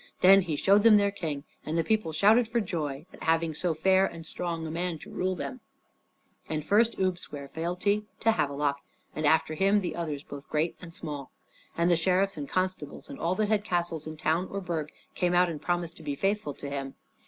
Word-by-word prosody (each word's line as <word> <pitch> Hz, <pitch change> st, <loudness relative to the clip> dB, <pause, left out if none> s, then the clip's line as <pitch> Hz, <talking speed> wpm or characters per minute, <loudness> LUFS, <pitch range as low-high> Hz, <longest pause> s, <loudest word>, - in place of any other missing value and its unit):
Then 195 Hz, +2 st, +8 dB
he 170 Hz, -5 st, -2 dB
showed 200 Hz, +7 st, +4 dB
them 220 Hz, -1 st, +7 dB
their 200 Hz, 0 st, +2 dB
King, 155 Hz, -7 st, -4 dB, 0.2 s
and 160 Hz, +2 st, -2 dB
the 165 Hz, -, +2 dB
people 215 Hz, -5 st, 0 dB
shouted 215 Hz, +9 st, +4 dB
for 235 Hz, +1 st, 0 dB
joy 155 Hz, -7 st, -3 dB
at -, -, -14 dB
having 165 Hz, 0 st, +1 dB
so 165 Hz, +2 st, 0 dB
fair 190 Hz, +4 st, +4 dB
and 165 Hz, -4 st, -3 dB
strong 165 Hz, -1 st, -3 dB
a 160 Hz, -, -4 dB
man 170 Hz, 0 st, -2 dB
to -, -, -12 dB
rule 185 Hz, 0 st, -1 dB
them. 255 Hz, +7 st, -5 dB, 0.9 s
And 155 Hz, -1 st, -2 dB
first 225 Hz, +3 st, +3 dB
Ubbe 185 Hz, -2 st, 0 dB
sware 140 Hz, -4 st, -8 dB
fealty 180 Hz, +7 st, -1 dB, 0.2 s
to 225 Hz, -, +4 dB
Havelok, 140 Hz, -6 st, 0 dB, 0.4 s
and 155 Hz, -1 st, +1 dB
after 160 Hz, 0 st, +3 dB
him 195 Hz, +6 st, +3 dB
the 180 Hz, -, -3 dB
others 155 Hz, -4 st, -3 dB
both 145 Hz, -1 st, -10 dB
great 155 Hz, +2 st, 0 dB
and 175 Hz, -2 st, -9 dB
small. 150 Hz, -5 st, -5 dB, 0.5 s
And 170 Hz, +1 st, +3 dB
the -, -, +6 dB
sheriffs 185 Hz, +4 st, +2 dB
and 145 Hz, -2 st, -6 dB
constables 185 Hz, +8 st, -3 dB
and 275 Hz, -, -8 dB
all 170 Hz, +2 st, 0 dB
that 215 Hz, 0 st, 0 dB
held 210 Hz, -2 st, +2 dB
castles 170 Hz, -5 st, -1 dB
in 155 Hz, 0 st, -7 dB
town 165 Hz, +4 st, +1 dB
or 200 Hz, -, -3 dB
burg 165 Hz, -5 st, -3 dB, 0.2 s
came 180 Hz, 0 st, +1 dB
out 180 Hz, 0 st, +5 dB
and 155 Hz, -3 st, -5 dB
promised 175 Hz, -1 st, -2 dB
to -, -, -11 dB
be 145 Hz, -2 st, -2 dB
faithful 195 Hz, -4 st, -1 dB
to 145 Hz, -, -7 dB
him. 135 Hz, -1 st, -4 dB
170 Hz, 215 wpm, -28 LUFS, 155-195 Hz, 0.9 s, Then